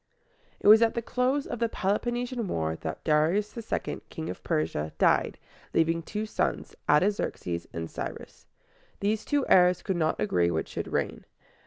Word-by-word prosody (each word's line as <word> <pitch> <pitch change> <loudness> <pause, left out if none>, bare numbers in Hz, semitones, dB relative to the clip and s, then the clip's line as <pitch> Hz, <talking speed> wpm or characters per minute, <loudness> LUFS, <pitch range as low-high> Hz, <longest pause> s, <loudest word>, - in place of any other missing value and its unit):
It - - -1
was 215 +2 +9
at 230 -1 +3
the 235 - 0
close 255 +4 0
of 240 - -5
the 230 -1 +1
Peloponnesian 240 +4 -1
War 80 - -1
that 80 -1 -6
Darius 165 +7 +2
II., 230 -2 -3
King - - -5
of - - -10
Persia, 75 0 -1
died, - - +3 0.4
leaving 165 +1 +2
two 210 +6 -4
sons, 215 - -2 0.2
Artaxerxes 150 - +1
and 80 0 -4
Cy´rus. - - -7 0.5
These 210 +2 0
two 290 -2 +1
heirs 180 -1 +5
could 190 -3 -1
not 160 -1 0
agree 90 -5 +2
which 80 -2 -2
should - - -5
reign. - - -2
190 Hz, 160 wpm, -28 LUFS, -, 0.5 s, was